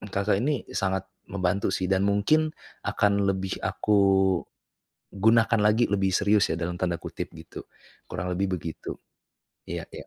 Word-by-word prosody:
Kakak 100 0 0
ini, 140 -3 0
sangat 95 -1 -1 0.2
membantu 95 0 0
sih. 95 - -2
Dan 95 +1 +2
mungkin 130 +11 +3 0.4
akan 100 -1 +2
lebih 95 0 -3
aku 105 -1 +1 1.1
gunakan 110 +3 +3
lagi, 105 +3 +4
"lebih 95 -1 +1
serius" 105 0 +3
ya, 80 - 0
dalam 90 +1 -2
tanda 90 -2 0
kutip - - -6
gitu. - - -10 0.5
Kurang 90 +2 -3
lebih 95 0 0
begitu. 80 -1 -6 0.7
Iya - - -4
iya. - - -8
100 Hz, 145 wpm, -26 LUFS, 95-105 Hz, 1.1 s, lagi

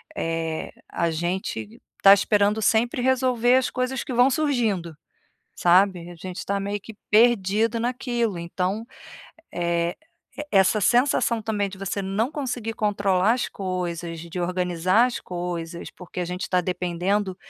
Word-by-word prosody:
eh, 165 -1 -3 0.2
a 170 -1 0
gente 165 - -4 0.2
tá 195 - +9
esperando 205 +1 +2
sempre 235 +3 +2
resolver 255 -1 +3
as 260 -1 +1
coisas 255 0 -2
que 260 - -5
vão 245 +2 +5
surgindo, 230 - 0 0.6
sabe. 180 -1 +3
A - - -11
gente 180 +2 -8
está 200 0 -2
meio 200 +1 -3
que 220 +2 -11
perdido 225 0 +3
naquilo, 240 -4 -1
então, 180 +5 -3 0.7
eh, 170 0 -1 0.4
e 295 - -4
essa 195 +2 +4
sensação 240 +1 +2
também, 210 -2 -1
de 190 -1 -10
você 195 +1 -3
não 200 +7 -1
conseguir 245 -6 -3
controlar 200 -1 +2
as 250 - -2
coisas, 175 -3 -4
de 170 +2 -7
organizar 180 +4 +2
as 250 - -4
coisas, 175 -1 -5
porque 180 0 -9
a 180 - -1
gente 180 +2 -4
tá 180 -1 +2
dependendo 180 +2 -1
195 Hz, 145 wpm, -24 LUFS, 175-230 Hz, 0.7 s, tá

